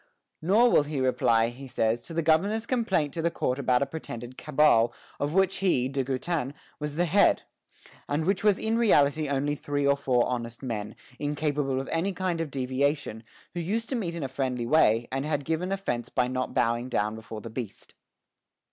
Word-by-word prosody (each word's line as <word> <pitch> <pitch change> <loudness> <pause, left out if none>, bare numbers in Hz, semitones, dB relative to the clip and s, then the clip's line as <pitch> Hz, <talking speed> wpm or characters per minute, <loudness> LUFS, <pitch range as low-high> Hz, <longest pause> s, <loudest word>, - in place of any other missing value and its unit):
Nor 215 +9 +4
will - - +6
he 145 -1 -3
reply, 115 -3 +2
he 130 +3 -10
says, 115 -1 0
to 165 - -8
the 165 - +1
governor's 195 +8 +2
complaint 200 - 0
to 165 - -2
the 170 - +2
court 130 -5 -2
about 130 -1 +2
a - - 0
pretended 130 -4 -7
cabal, 140 -6 +3 0.3
of 145 +3 -1
which 190 0 +3
he, 175 -10 +2
De 135 0 -1
Goutin, 135 +2 -2 0.2
was 150 -1 -4
the 175 +2 +2
head, 200 +4 +4 0.7
and 150 +2 0
which 195 +1 +1
was 205 -2 +4
in 225 +1 0
reality 150 -8 +3
only 140 +1 0
three 145 -1 -2
or 140 0 +4
four 130 -3 +2
honest 120 0 -4
men, 110 -4 -4 0.2
incapable 145 -2 -1
of 135 - -5
any 180 +4 0
kind 180 -3 -1
of 165 - -3
deviation, 130 -2 -1 0.3
who 175 - -3
used 220 +7 -2
to 265 - -1
meet 180 -8 -2
in 165 - -4
a - - -1
friendly 130 -2 -2
way, 115 -4 +3
and 135 +1 -1
had 145 -2 -2
given 165 +4 -1
offence 120 -12 -2
by 125 -1 +1
not 130 0 -3
bowing 120 +2 +1
down 105 -3 0
before 110 -1 -8
the 115 - -8
beast. 115 -3 -7
145 Hz, 195 wpm, -27 LUFS, 125-170 Hz, 0.7 s, will